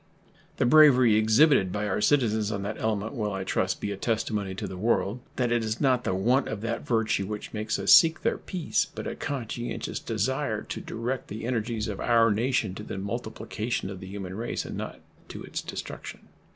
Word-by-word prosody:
The - - +2
bravery 130 -5 +7
exhibited 110 - +4
by 105 +1 -2
our 105 - -1
citizens 110 -7 +2
on 100 -2 -3
that 105 +2 -4
element 110 0 -1
will, 105 -5 -2
I 95 0 -3
trust, 95 0 -1
be 100 - -3
a 100 - -4
testimony 105 -3 -1
to 105 - -4
the 95 -1 -6
world 110 +2 0 0.2
that 125 -2 0
it 120 -1 +2
is 110 +1 -2
not 130 -3 +2
the 95 - 0
want 120 +8 +2
of 105 -1 -4
that 115 +1 -3
virtue 110 -4 +1
which 105 0 -6
makes 110 0 -1
us 100 0 +5
seek 165 -1 +6
their 230 - +1
peace, 180 -5 -1
but - - -5
a - - -4
conscientious 120 -3 -4
desire - - -1
to - - -6
direct 120 +3 -4
the 110 +2 -6
energies 115 -2 -1
of 105 -3 -5
our 115 -2 +4
nation 115 -2 0
to 105 - -7
the 100 - -6
multiplication 110 0 -4
of 95 - -7
the 95 - -9
human 95 -1 -6
race, 115 +3 -3
and - - -6
not - - -6 0.3
to - - -8
its - - -4
destruction. - - -7
110 Hz, 205 wpm, -27 LUFS, 100-120 Hz, 0.3 s, bravery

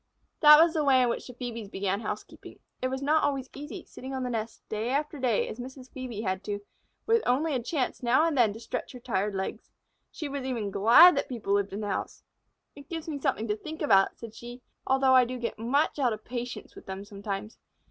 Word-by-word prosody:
That 300 -1 +9
was 330 0 +5
the 315 -3 +1
way 265 -3 +5
in 245 - +2
which - - -3
the 250 - -9
Phœbes 230 -4 -6
began 195 0 -1
housekeeping. 210 -1 -7 0.2
It 255 - +1
was 265 +1 -4
not 310 +2 +3
always 275 -2 -1
easy, 295 +2 -8
sitting 265 +1 -8
on 260 - -2
the 250 - -2
nest 225 -1 -5
day 220 +2 -2
after 295 +2 -1
day 250 -4 +1
as 225 - -7
Mrs. 260 +1 -9
Phœbe 245 -5 -6
had 190 -1 -2
to, 205 -1 -3 0.5
with 455 0 +3
only 290 +5 +2
a 255 - 0
chance 260 +1 -2
now 255 +6 +3
and 330 -3 0
then 235 -5 +4
to 220 - -9
stretch 235 - -5
her 250 - -9
tired 205 -4 -1
legs. 190 0 -4 0.4
She 310 - -6
was 280 -1 -4
even 235 -6 -2
glad 245 - +8
that 280 - -1
people 225 -6 -2
lived 200 0 +1
in 200 +2 -4
the 210 - -3
house. - - -4 0.5
"It 285 -1 -13
gives 330 -1 -5
me 295 -3 -4
something 260 -5 -1
to 210 - 0
think 310 +8 -7
about," 195 -9 +4
said 230 -2 -9
she, 240 +2 -10 0.2
"although 265 0 +4
I 255 -1 +7
do 250 +1 -4
get 235 -2 -4
much 275 +6 +1
out 250 -5 +2
of 215 0 -9
patience 245 0 -6
with - - -14
them 190 +1 -6
sometimes. 200 +1 -6
250 Hz, 230 wpm, -28 LUFS, 215-280 Hz, 0.5 s, That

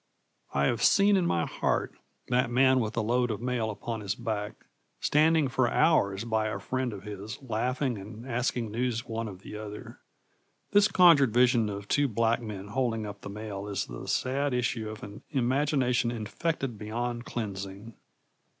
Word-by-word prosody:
I 70 0 +1
have 115 - 0
seen 200 0 +5
in 180 -3 +2
my 85 -1 +1
heart - - -1 0.4
that 125 -1 +2
man 130 +1 +4
with 110 -3 -2
the 115 - 0
load 120 +2 +1
of 110 - -2
mail 120 -2 -1
upon 110 +1 -4
his 100 -1 -2
back, 105 -1 -4 0.3
standing 155 0 +3
for 130 -1 +1
hours 105 -11 +3
by 110 -2 0
a 105 - -2
friend 130 +5 -2
of 100 -2 -8
his, 105 +2 -7
laughing 125 0 -1
and 105 +4 -9
asking 120 -2 -1
news 120 0 -1
one 115 0 -3
of 95 -2 -10
the - - -8
other. 105 -1 -8 0.7
This 205 0 +6
conjured 165 - +6
vision 120 -3 +4
of 100 0 -6
two 145 +5 +2
black 115 0 +1
men 105 -3 -7
holding 115 -2 -1
up 100 -1 -8
the - - -7
mail 105 -1 -6
is 100 -1 -2
the - - -8
sad 135 +1 0
issue 120 -3 -1
of 110 0 -8
an 100 0 -9
imagination 130 -1 +2
infected 120 +2 -3
beyond 120 +3 -3
cleansing. 100 0 -5
115 Hz, 170 wpm, -29 LUFS, 105-130 Hz, 0.7 s, This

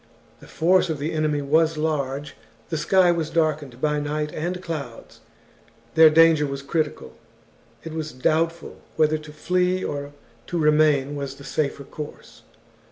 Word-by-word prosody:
The - - -15
force 180 +2 +2
of 160 - -1
the 150 +4 -3
enemy 155 -2 0
was 160 +3 +2
large, 145 -2 -2 0.3
the 160 - -2
sky 185 +1 +4
was 165 -2 -1
darkened 150 -6 -1
by 150 +1 0
night 150 +1 -3
and 175 +3 -3
clouds, 150 -10 -7 0.7
their 160 0 +8
danger 160 -1 +5
was 140 0 -5
critical, 155 +2 -2 0.7
it 160 - -7
was 155 -1 -4
doubtful 165 +6 -1 0.2
whether 155 0 +2
to 155 0 -12
flee 180 +3 0
or 145 0 -4 0.4
to 175 - -3
remain 150 -3 +3
was 140 -1 -5
the 140 - -13
safer 140 -1 -2
course. 150 +2 -10
155 Hz, 150 wpm, -23 LUFS, 145-165 Hz, 0.7 s, their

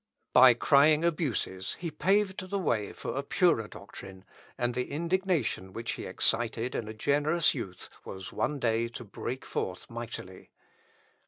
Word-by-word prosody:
By 125 -2 +8
crying 150 +5 +5
abuses 120 - -1
he 170 -2 -4
paved 190 +3 +1
the 200 - -1
way 110 - 0
for - - -5
a - - 0
purer - - +2
doctrine, 95 -1 -11 0.3
and 120 0 0
the 125 +1 -2
indignation 170 - -1
which 115 +1 -3
he - - -5
excited 115 +1 +1
in 110 - -3
a 110 - -6
generous 150 +8 +2
youth 95 -9 -6 0.2
was 95 -1 -8
one 150 - -1
day 115 -2 +1
to 120 +1 -8
break 120 +4 -6
forth 90 +3 -4
mightily. 115 -5 -7
125 Hz, 150 wpm, -29 LUFS, 110-155 Hz, 0.3 s, By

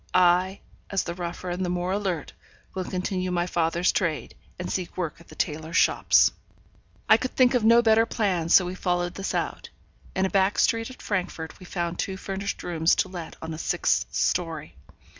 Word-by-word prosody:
I, 185 +2 +4 0.3
as 195 - 0
the 170 - -4
rougher 175 0 -5
and 180 +2 -2
the 180 - -1
more 180 +1 -1
alert, 190 -6 -2 0.4
will 190 - -2
continue 185 0 -2
my 175 -1 0
father's 175 0 +1
trade, 170 -6 -1 0.2
and 180 - -4
seek 185 -2 -4
work 175 -4 -3
at 170 - -18
the - - -13
tailors' 160 +1 -2
shops.' - - +4 0.8
I 220 - +7
could 255 +2 -4
think 255 -1 +5
of 245 -3 +2
no 230 +2 +6
better 225 0 +4
plan, 185 -9 0
so 185 +1 +7
we 180 - -4
followed 175 -1 -1
this 195 - -3
out. - - -3 0.5
In 190 - +2
a - - 0
back 195 0 +2
street 225 +1 +2
at 255 - -12
Frankfort 180 -5 -3
we 185 - -12
found 175 -1 -3
two 190 -1 -2
furnished 195 +1 -4
rooms 165 -1 +2
to 185 - 0
let 175 -3 -7
on 160 0 -4
a 155 - -7
sixth - - +1
story. 160 -3 -1
180 Hz, 195 wpm, -26 LUFS, 170-195 Hz, 0.8 s, I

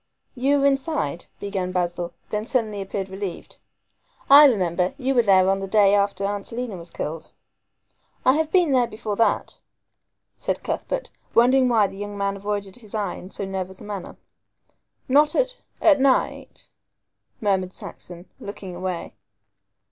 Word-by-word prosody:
"You 275 +2 +2
were 275 - +2
inside," 270 - 0
began 195 -3 -3
Basil, 175 -1 -2 0.2
then 215 +1 -2
suddenly 220 -6 0
appeared 195 0 -4
relieved. 190 -1 -7 0.7
"I 290 +2 +11
remember; 180 - +2
you 270 -1 0
were 245 - +5
there 190 -4 +4
on 195 0 +2
the 195 - -4
day 200 0 +4
after 200 -1 +1
Aunt 200 0 -3
Selina 240 -3 -4
was 170 -1 -8
killed." 155 +2 -5 0.9
"I 260 - +6
have 315 +1 0
been 355 -5 +4
there 250 -2 +3
before 215 -2 -4
that," 230 - 0 0.7
said - - -3
Cuthbert, - - -3 0.2
wondering 255 +2 +5
why 225 -4 +4
the 195 - -6
young 205 0 -6
man 200 0 -1
avoided 200 0 -4
his 220 -3 -10
eye 205 -4 -1
in 185 - -10
so 200 - -5
nervous 190 -1 -5
a - - -11
manner. 200 -3 -7 0.9
"Not 295 +3 +4
at - - +1 0.2
at 295 -3 +5
night?" 270 -1 0 0.7
murmured 190 -3 0
Saxon, 175 -1 -10
looking 200 -2 -8
away. 180 -1 -4
205 Hz, 155 wpm, -23 LUFS, 190-255 Hz, 0.9 s, I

